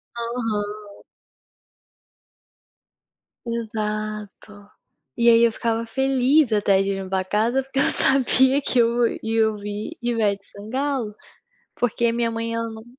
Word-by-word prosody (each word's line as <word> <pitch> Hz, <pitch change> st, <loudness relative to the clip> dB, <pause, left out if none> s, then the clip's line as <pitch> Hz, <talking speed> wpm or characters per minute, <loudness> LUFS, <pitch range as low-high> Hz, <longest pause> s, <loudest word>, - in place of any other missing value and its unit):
Aham. 215 Hz, -3 st, -4 dB, 2.5 s
Exato. 215 Hz, -2 st, -5 dB, 0.5 s
E 235 Hz, 0 st, +4 dB
aí 230 Hz, 0 st, +6 dB
eu 230 Hz, -, +4 dB
ficava 230 Hz, +1 st, -2 dB
feliz 265 Hz, +2 st, +2 dB
até 200 Hz, -2 st, +3 dB
de 195 Hz, 0 st, -1 dB
limpar 190 Hz, 0 st, -2 dB
a -, -, -7 dB
casa 230 Hz, +7 st, +1 dB
porque 270 Hz, 0 st, -3 dB
eu -, -, +4 dB
sabia 265 Hz, +1 st, +3 dB
que 255 Hz, -, +1 dB
eu 235 Hz, +1 st, +3 dB, 0.2 s
ia 220 Hz, 0 st, +2 dB
ouvir 210 Hz, 0 st, -6 dB
Ivete 215 Hz, -4 st, 0 dB
Sangalo. 235 Hz, +1 st, -3 dB, 0.6 s
Porque 235 Hz, -1 st, +1 dB
minha 235 Hz, 0 st, 0 dB
mãe 230 Hz, 0 st, -3 dB
ela 230 Hz, 0 st, -2 dB
não 220 Hz, 0 st, -10 dB
225 Hz, 120 wpm, -23 LUFS, 210-240 Hz, 2.5 s, aí